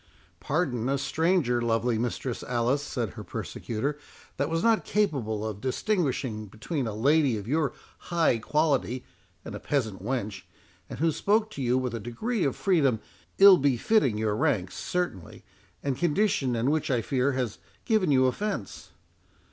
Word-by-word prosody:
"Pardon 135 -6 -1
a 140 - +1
stranger, 150 -4 +1
lovely 115 0 +1
Mistress 120 +1 -3
Alice," 125 +3 0
said 125 -6 -3
her - - -8
persecutor, 140 +6 -4 0.4
"that 140 +2 0
was 165 +1 -1
not 225 -1 +3
capable 125 - 0
of 105 -2 -6
distinguishing 130 - -1
between 120 - -4
a 110 - -4
lady 140 +1 +3
of 105 0 -7
your 150 0 +1 0.4
high 165 -9 +2
quality 135 -2 0 0.4
and - - -7
a - - -5
peasant 110 -10 -2
wench, 110 -4 -3 0.5
and - - -6
who 165 +1 +2
spoke 215 +6 +1
to 140 - -6
you 125 0 +2
with 125 -2 -2
a 115 - -3
degree 190 - -2
of 135 - 0
freedom, 145 - +2 0.4
ill 195 -2 +9
befitting 135 - +2
your 110 -1 0
rank, 95 -4 0
certainly, 175 - -4 0.4
and 135 -2 -2
condition, 175 - +1
and 120 +5 +1
which, 155 0 0
I 120 -4 +1
fear, 135 +2 +1
has 125 -4 -2 0.3
given 215 -7 +2
you 130 -2 +4
offence." 160 - -3
130 Hz, 155 wpm, -27 LUFS, 115-160 Hz, 0.5 s, ill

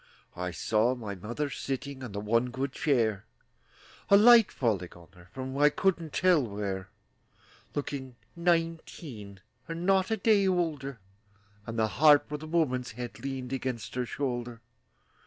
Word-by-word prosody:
I 90 0 -3
saw 110 +7 +1
my 110 -5 -6
mother 120 +10 -4
sitting 135 0 -5
On 125 - -6
the 100 - -4
one 115 +4 +1
good 130 +2 -3
chair, 115 -9 0 0.8
A 200 - +8
light 230 0 +7
falling 100 -8 -1
on 85 -1 -16
her 90 -2 -17
From 130 0 -6
I 150 0 +6
couldn't 170 -1 0
tell 180 -2 +4
where, 100 -4 -4 0.9
Looking 135 -3 -4 0.2
nineteen, 165 - -2 0.3
And 165 +1 -5
not 190 -1 +3
a 220 - 0
day 200 -1 +3
older, 155 -8 -1 0.7
And 115 0 -5
the 110 -1 +2
harp 145 +4 +5
with 150 0 -4
a 155 - -7
woman's 130 -8 0
head 120 +1 -7
Leaned 135 -2 -4
against 125 -5 -4
her 125 -1 -2
shoulder. 120 -3 -3
130 Hz, 150 wpm, -29 LUFS, 110-160 Hz, 0.9 s, A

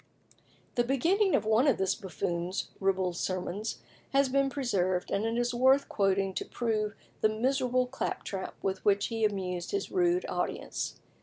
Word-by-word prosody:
The 240 - +2
beginning 345 - +2
of - - +1
one 220 +6 +4
of 270 - +4
this 190 0 +1
buffoon's 180 -2 -3
ribald 190 -2 +1
sermons 185 +4 -3 0.3
has 275 -1 +4
been 275 +1 +2
preserved, 190 -10 0
and 210 +3 +1
is 240 0 +1
worth 260 +3 +4
quoting 195 -1 +1
to - - -2
prove 215 -3 -1 0.3
the 215 - +5
miserable 255 +2 +1
claptrap 210 -6 -4
with 190 -1 -1
which 200 0 +3
he 225 -1 -2
amused 185 -4 -1
his 400 -1 -2
rude 360 -1 +2
audience. - - -3
220 Hz, 150 wpm, -30 LUFS, 190-265 Hz, 0.3 s, the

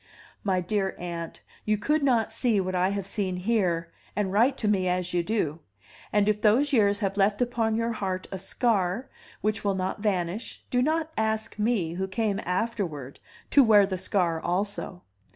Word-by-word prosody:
My 185 -3 +1
dear 195 +1 -1
aunt, 170 -1 -6 0.2
you 215 0 +1
could 300 +8 +1
not 245 -6 +2
see 230 -5 +2
what 185 0 -2
I 180 +1 +2
have 200 -1 -3
seen 195 -2 -2
here, 180 -5 0 0.2
and 195 -2 -1
write 245 +6 +3
to 215 - -1
me 190 -3 +2
as 180 0 -1
you 175 - +2
do; 170 -5 -1 0.5
and 210 -1 +3
if 210 0 +1
those 255 +8 +3
years 205 -4 +4
have 195 -1 -1
left 200 +1 +2
upon 235 -3 +1
your 230 +1 0
heart 190 -4 -3
a 190 - -4
scar 195 +2 0 0.3
which 215 +1 -1
will 200 -1 +1
not 185 +1 -2
vanish, 195 0 -2
do 245 - +3
not 315 +3 0
ask 220 0 -1
me, 210 -7 +1
who 190 +2 -2
came 200 +1 -1
afterward, 180 - -2 0.3
to 280 - +7
wear 210 -4 +6
the 190 -2 -3
scar 170 -4 0
also. 185 0 -2
200 Hz, 180 wpm, -27 LUFS, 185-225 Hz, 0.5 s, to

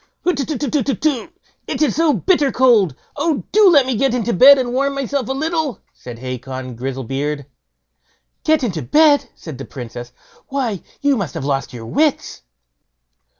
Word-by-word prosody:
"Hutetutetutetu! 285 - -1 0.4
it - - -3
is 295 -8 +1
so 325 -1 +3
bitter 295 -3 +2
cold! 230 - +3 0.2
Oh, 300 -1 0
do 420 -1 +6
let 285 -6 +5
me 260 -1 -1
get 255 +2 +1
into 235 -1 -1
bed 275 +8 +8
and 245 -2 -2
warm 275 +2 0
myself 275 -2 -2
a - - 0
little", 310 - -2
said 120 -2 -10
Hacon 130 0 -6
Grizzlebeard. 135 +3 -4 1.0
"Get 310 -3 +2
into 180 -10 -2
bed!" 290 - +3
said 155 -6 -10
the 135 - -6
Princess; 120 -1 -8 0.4
"why, 250 -9 -2 0.2
you 285 -1 +3
must 195 - -4
have 150 -4 -4
lost 140 -1 -2
your 115 -2 -9
wits." 295 - -1
255 Hz, 150 wpm, -19 LUFS, -, 1.0 s, bed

